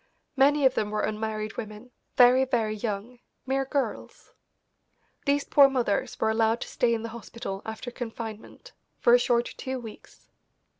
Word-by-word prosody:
Many 285 +1 +4
of 260 - +5
them 210 - -1
were 210 0 -2
unmarried 215 0 -3
women, 215 +2 -8 0.3
very, 250 +1 +7
very 235 -5 0
young, 215 +2 -5 0.3
mere 270 +1 0
girls. 275 0 -4 0.9
These 285 0 +2
poor 280 -1 +6
mothers 240 -7 -1
were 220 - +2
allowed 225 +1 +1
to - - -4
stay 235 -1 +1
in 225 - -5
the 230 - -4
hospital 220 -3 -7
after 220 +3 -6
confinement 230 - -8 0.3
for 240 - +4
a 245 - +7
short 240 -1 +2
two 260 0 -4
weeks. 225 -3 -13
235 Hz, 155 wpm, -27 LUFS, 220-260 Hz, 0.9 s, very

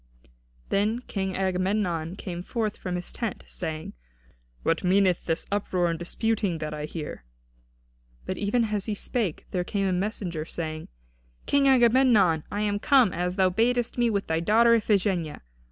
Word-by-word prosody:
Then 215 +4 +1
King 190 -5 -3
Agamemnon 185 -3 0
came 175 -3 -6
forth 215 +2 -2
from 180 -1 -4
his 180 0 -5
tent, 230 -5 -4
saying: 160 -3 -5 0.7
"What 165 - +1
meaneth 185 -1 +3
this 165 -1 -1
uproar 185 -4 0
and 165 - -4
disputing 200 0 -1
that 155 -1 -4
I 150 0 -4
hear?" 150 - -6 1.0
But - - -4
even 210 +4 +1
as 205 0 -2
he 215 - -1
spake 205 -5 -2
there 180 -1 0
came 195 +1 -1
a 185 - +1
messenger, 180 -4 -2
saying: 155 -1 -5 0.6
"King 280 -1 +3
Agamemnon, 235 - +4
I 205 - -2
am 205 -1 0
come, 250 -4 +4
as 180 +1 -2
thou 190 -2 +3
badest 240 +4 +1
me, 240 -1 +3
with 200 -2 -1
thy 160 0 0
daughter 225 +7 +4
Iphigenia. 195 -7 +1
195 Hz, 155 wpm, -26 LUFS, 175-220 Hz, 1.0 s, Agamemnon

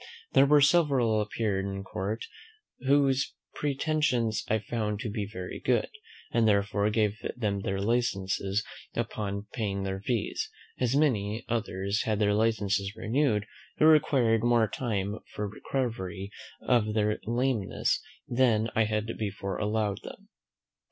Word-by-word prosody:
There 140 - +6
were 145 0 +6
several 135 -7 +4
appeared 105 -2 -1
in 95 0 -4
court, 100 +4 -3 0.6
whose 135 -1 +3 0.2
pretensions 140 -6 0
I 110 - +2
found 105 -1 -2
to 110 - -3
be 105 -2 -3
very 90 -2 -6
good, 125 - +1 0.4
and, 115 -1 +3
therefore, 100 0 +2
gave 105 -1 +1 0.2
them 105 -4 0
their 95 0 -2
licenses 100 -3 0 0.3
upon 100 -1 -3
paying 100 -5 -2
their 95 0 -2
fees; 115 0 -1 0.3
as 125 0 +1
many 115 -7 +1
others 105 -2 -1
had 110 -2 0
their 105 -1 +2
licenses 105 -2 +1
renewed, 115 -3 +1 0.3
who - - +4
required 130 -8 +4
more 120 -2 +4
time 105 -3 -2 0.2
for 105 - -2
recovery 100 -4 -3 0.3
of 110 -4 +2
their 105 0 +1
lameness 120 -3 0 0.3
than 120 -3 +2
I 110 - +3
had 110 +1 -2
before 100 -2 -3
allowed 105 -1 0
them. - - -11
110 Hz, 130 wpm, -29 LUFS, 100-120 Hz, 0.6 s, There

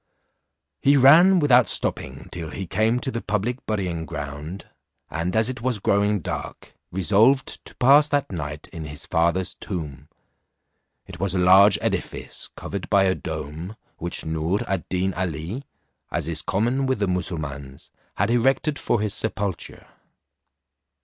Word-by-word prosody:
He 140 +1 +5
ran 165 +8 +7
without 130 -7 +5
stopping - - -2
till 85 -3 -5
he 95 - -5
came 110 +7 +1
to 130 - -2
the 115 - -3
public 110 +5 -2
burying 90 -6 -2
ground, 75 +3 -6 0.4
and 85 +5 -2
as 110 0 +3
it 130 -3 -4
was 125 -2 0
growing 100 0 +1
dark, - - -6 0.2
resolved 105 +9 +2
to - - -10
pass 140 +4 +6
that 145 -5 0
night 75 -3 -5
in 80 -3 -7
his 75 -1 -7
father's 85 +2 +1
tomb. 75 -7 -6 1.0
It 90 -2 -11
was 95 0 0
a - - +1
large 95 +3 +6
edifice, - - -3
covered 100 -2 -6
by 100 -2 +4
a 95 -1 +3
dome, 80 +5 -6 0.2
which 85 +1 -3
Noor 80 +5 -1
ad 95 -4 -3
Deen 95 +1 0
Ali, 90 - -4 0.4
as - - -2
is 85 -2 -1
common 120 +7 0
with 130 - +1
the 100 - 0
Mussulmauns, 75 -7 -4 0.2
had 100 +4 +1
erected 135 +5 +1
for 115 - 0
his 105 -2 0
sepulture. 100 -5 -3
95 Hz, 150 wpm, -23 LUFS, 85-115 Hz, 1.0 s, ran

